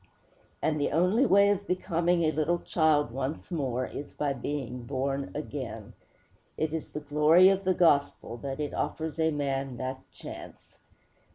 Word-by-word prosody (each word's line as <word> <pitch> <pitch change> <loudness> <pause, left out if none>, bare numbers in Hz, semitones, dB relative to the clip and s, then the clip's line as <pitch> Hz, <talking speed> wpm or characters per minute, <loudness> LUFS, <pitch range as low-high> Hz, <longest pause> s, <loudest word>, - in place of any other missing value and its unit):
And 150 -1 +1
the - - +1
only 185 - +3
way 200 0 +5
of 200 0 -2
becoming 175 -1 +1
a 155 - +3
little 155 +3 +1
child 155 -6 +2
once 135 +8 -4
more 130 -6 -1
is 145 - -7
by 145 -2 -1
being 125 -1 -4
born 135 0 -2
again. - - -6 0.6
It 155 0 -1
is 160 - -4
the 150 - -6
glory 150 +5 +5
of 195 0 0
the 185 -1 +2
gospel 145 -7 +2
that 135 +2 -5
it 150 -1 -3
offers 160 0 -3
a 160 0 +3
man 135 -3 -2
that 130 +1 -4
chance. - - -11
150 Hz, 160 wpm, -28 LUFS, 135-170 Hz, 0.6 s, way